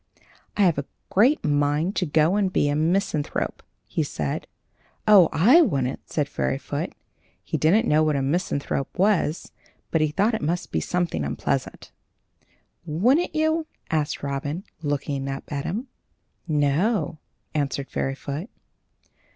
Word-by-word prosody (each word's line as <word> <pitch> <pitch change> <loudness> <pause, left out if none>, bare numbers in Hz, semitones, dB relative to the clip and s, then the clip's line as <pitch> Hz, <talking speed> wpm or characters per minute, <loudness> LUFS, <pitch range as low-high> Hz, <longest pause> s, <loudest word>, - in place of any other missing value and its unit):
"I 205 - +4
have 170 -6 +3
a 140 - -4 0.3
great 250 +10 +4
mind 145 +5 +1
to 180 - +1
go 155 +4 +3
and 200 -3 +1
be 145 - +2
a 145 - +1
misanthrope," 160 -1 0 0.2
he - - -2
said. - - -3 0.6
"Oh! 195 -6 +8
I 240 - +6
wouldn't," 140 - -1
said 145 -3 0
Fairyfoot. 65 -1 -3 0.5
He - - -4
didn't 205 +10 +3
know 150 +1 +4
what 155 -1 +2
a 135 - 0
misanthrope 140 -2 -1
was, 185 -4 +1 0.4
but 160 - +2
he 155 - +3
thought 200 +10 +1
it 220 - -1
must 170 +4 -2
be - - +1
something 175 - -1
unpleasant. 70 0 -3 0.9
"Wouldn't 235 - +2
you?" 315 +1 +1 0.2
said 155 -3 -1
Robin, 145 +5 -3 0.2
looking 145 -2 -2
up 135 0 -4
at 140 -1 -3
him. 220 +8 -2 0.6
"No," 155 +3 +1 0.3
answered 140 -2 -1
Fairyfoot. 140 - -3
155 Hz, 135 wpm, -24 LUFS, 145-195 Hz, 0.9 s, Oh